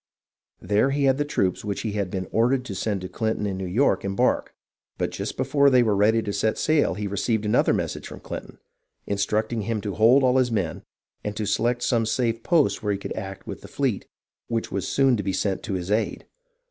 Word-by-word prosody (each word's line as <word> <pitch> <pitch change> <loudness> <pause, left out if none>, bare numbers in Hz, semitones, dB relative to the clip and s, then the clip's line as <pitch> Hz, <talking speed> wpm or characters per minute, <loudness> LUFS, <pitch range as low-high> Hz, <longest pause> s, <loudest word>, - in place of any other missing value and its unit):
There 105 +6 +2
he 140 +1 0
had 135 0 +3
the 145 - +1
troops 95 -10 0
which 100 -2 -3
he 110 - -2
had 100 -3 -2
been 95 0 -4
ordered 125 +3 +2
to 105 - -5
send 95 +1 -2
to 95 - -5
Clinton 110 +2 -2
in 100 -2 -2
New 95 0 -4
York 100 +1 +2
embark, 95 0 0 0.4
but - - -1
just - - -5
before 140 -1 +3
they 125 -2 +5
were 110 -3 +2
ready 110 +3 +3
to 100 - -3
set 110 +1 0
sail 155 -1 +2
he 105 - -4
received 105 +2 -1
another 105 - +3
message - - -2
from - - -9
Clinton, - - -8 0.5
instructing 105 +3 -1
him 110 +1 -2
to 100 -1 -4
hold 120 +7 +5
all 130 0 +4
his 125 -2 +2
men 95 -7 -1 0.4
and 105 0 -4
to 110 - -1
select 120 +4 0
some 115 -2 +1
safe 115 0 0
post 160 -1 +2
where 105 -2 0
he - - -2
could 100 - -5
act 95 0 -7
with - - -7
the - - -10
fleet - - -2 0.4
which 115 -1 -2
was 100 - -2
soon 135 -3 +3
to - - -1
be 95 -1 -2
sent 95 -1 -1
to 105 - -4
his 90 +1 -4
aid. 110 +2 0
110 Hz, 225 wpm, -24 LUFS, 100-120 Hz, 0.5 s, they